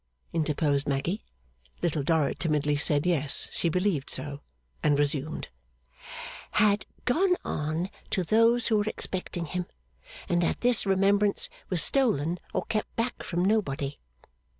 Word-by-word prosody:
interposed 150 -3 0
Maggy. 145 +9 -1 0.6
Little 160 -3 +1
Dorrit 150 0 +1
timidly 150 -3 +1
said 145 +1 +2
Yes, 150 -5 +3
she 170 - 0
believed 180 -4 0
so; 145 -1 -4 0.4
and 145 -1 +3
resumed: 145 +1 -1 0.5
' - - -11
Had 205 0 +2 0.2
gone 360 +8 +3
on 155 +5 -2 0.2
to 185 - 0
those 230 +5 +3
who 220 - +3
were 205 - +1
expecting 180 -4 -3
him, 180 +2 -4 0.6
and 175 0 +1
that 170 - 0
this 245 -4 +4
remembrance 200 +1 +3 0.2
was 180 -3 +3
stolen 180 - +2
or - - -1
kept 215 -1 -3
back 235 +2 -2
from 175 +1 -1
nobody. 145 -9 0
175 Hz, 135 wpm, -28 LUFS, 150-205 Hz, 0.6 s, this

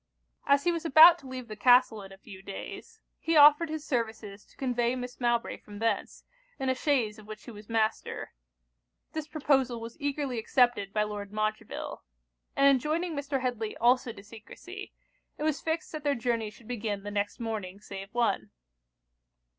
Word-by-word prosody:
As 280 0 +4
he 350 - +3
was 335 -1 -3
about 325 +2 +8
to 270 - -13
leave 255 -2 -7
the 215 - -7
castle 245 0 +4
in 195 0 -11
a 195 - -12
few 195 -1 -12
days, 440 - -8 0.2
he 325 0 +1
offered 295 +2 +7
his 310 -1 -5
services 220 -5 -3
to - - -25
convey 245 -2 0
Miss 250 0 -7
Mowbray 240 -1 0
from 205 -1 -12
thence, 225 +2 -2 0.3
in 265 -2 -1
a - - +3
chaise 250 -6 0
of 210 - -14
which 215 0 -9
he - - -9
was 210 0 -13
master. 220 -1 -1 0.8
This 315 -2 -4
proposal 270 -6 +1
was 230 +5 -9
eagerly 280 -4 -2
accepted 240 -4 +2
by 210 +1 +1
Lord 205 -1 -5
Montreville. 215 0 -3 0.5
And 275 - +3
enjoining 305 +5 +1
Mr. 280 -1 -2
Headly 235 -4 -3
also 245 +1 +3
to 200 -3 -12
secresy, 235 - -11 0.5
it - - -5
was 310 -2 0
fixed 320 0 -2
that 310 -2 -6
their 285 -1 +1
journey 230 -2 -1
should 215 +1 -17
begin 210 -4 -3
the 205 - -5
next 205 0 -2
morning 210 -5 -4
save 195 -1 -9
one. 235 - 0
240 Hz, 180 wpm, -29 LUFS, 215-285 Hz, 0.8 s, about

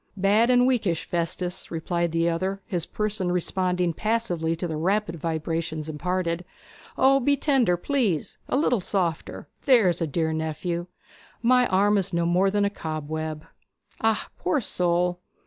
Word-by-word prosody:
'Bad 205 +5 +3
and 245 0 +5
weakish, 215 -10 +1
Festus,' 175 +1 -3
replied 170 +1 -1
the 165 +1 +1
other, 185 +4 -1
his 175 -6 -2
person 210 -4 -1
responding 180 -1 0
passively 180 -6 -1
to 175 +2 -3
the 160 - -3
rapid 185 +2 0
vibrations 160 0 -3
imparted. 170 +2 -2 0.5
'O, 270 +1 +5
be 285 +2 +2
tender, 255 - +2
please 215 - -1
a - - +1
little 250 -7 +2
softer, 175 -4 -2 0.2
there's 205 - +4
a 165 - +1
dear 160 +2 -1
nephew! 160 +2 -3 0.6
My 250 +1 +4
arm 205 +2 +3
is 190 -1 -2
no 170 0 +1
more 180 +3 +3
than 205 +1 +1
a 200 - 0
cobweb.' 155 -2 -4 0.6
'Ah, 225 -2 +1
poor 180 - +1
soul!' 180 -4 0
180 Hz, 145 wpm, -25 LUFS, 165-210 Hz, 0.6 s, and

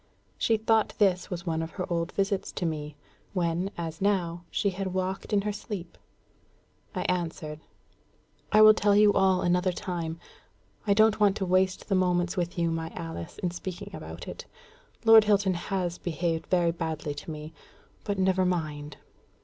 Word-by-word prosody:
She 225 - +3
thought 220 0 +2
this 190 -4 +2
was 180 -1 -5
one 160 -2 -1
of 165 - -4
her 185 - -3
old 170 0 -1
visits 195 -1 -1
to 180 - -3
me, 150 -2 -3 0.4
when, 175 0 0
as 165 -1 -5
now, 175 -4 0
she 200 - 0
had 190 0 -4
walked 185 +2 -2
in 205 -1 +3
her 210 +1 -2
sleep. 200 -3 -7 1.0
I - - -1
answered, 165 -4 -2 0.9
"I 215 +1 +7
will 215 0 +10
tell 205 -1 +3
you 205 0 +6
all 190 -1 +3
another 180 +1 +2
time. 170 -2 -4 0.7
I 200 - +4
don't 220 0 +4
want 205 -1 +4
to 195 - -1
waste 185 +1 +1
the 200 - 0
moments 180 -1 +2
with 175 0 -2
you, 170 -1 +1
my 165 0 -3
Alice, 165 - -6
in 180 - +1
speaking 175 +1 -6
about - - -8
it. - - -8 0.6
Lord 225 -1 +8
Hilton 200 -2 +3
has 175 0 -2
behaved 165 -1 -2
very 175 -2 +3
badly 160 -3 -3
to 145 - -9
me; 155 0 -7 0.5
but 205 -1 -2
never 190 0 +2
mind." 155 -5 -2
180 Hz, 170 wpm, -28 LUFS, 165-195 Hz, 1.0 s, will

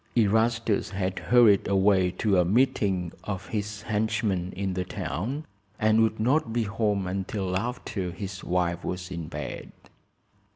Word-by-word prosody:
Erastus 110 0 +2
had 95 -1 -2
hurried 115 -4 +5
away 95 -1 +3
to 95 +1 +1
a - - +5
meeting 95 -4 +1
of 95 -2 -5
his 105 -1 -4
henchmen 105 -4 0
in 95 0 -2
the 90 0 -1
town, 100 - -4 0.3
and 110 +1 +3
would 110 -1 +1
not 125 +2 +2
be 115 0 +1
home 105 -2 0
until 95 0 -2
after 105 -3 -3
his 95 +1 -6
wife 90 -1 0
was 90 0 -4
in 85 -3 -5
bed. 75 -3 -6
100 Hz, 140 wpm, -27 LUFS, 90-110 Hz, 0.3 s, hurried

